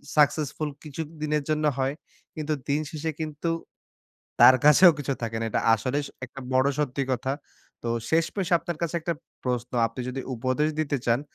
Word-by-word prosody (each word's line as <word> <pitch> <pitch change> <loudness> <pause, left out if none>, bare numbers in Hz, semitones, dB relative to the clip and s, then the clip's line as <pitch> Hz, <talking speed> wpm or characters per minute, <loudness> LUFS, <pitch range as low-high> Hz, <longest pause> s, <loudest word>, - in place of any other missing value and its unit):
Successful 150 0 +2
কিছু 155 0 -6 0.2
দিনের 150 -1 0
জন্য 155 0 +1
হয়। 135 +1 0 0.4
কিন্তু 155 -1 -2 0.2
দিন 145 +2 +2
শেষে 160 0 -3
কিন্তু 155 +1 -3 0.9
তার 130 - +9
কাছেও 150 +5 +9
কিছু 140 -1 -1
থাকে 115 -1 -2
না। - - -1
এটা - - +1
আসলেই 130 +6 -1
স - - -8 0.2
একটা 135 +2 -10
বড় 130 +1 +4
সত্যি 140 -2 0
কথা। 130 +2 -1 0.5
তো 120 - -3 0.2
শেষমেশ 165 +3 +1
আপনার 170 0 -5
কাছে 170 0 -1
একটা 170 +2 -1 0.3
প্রশ্ন। 125 -1 -1 0.2
আপনি 115 +3 -7
যদি 130 +1 -3
উপদেশ 130 +5 0
দিতে 145 -2 0
চান, 120 +2 +3
145 Hz, 170 wpm, -26 LUFS, 130-155 Hz, 0.9 s, তার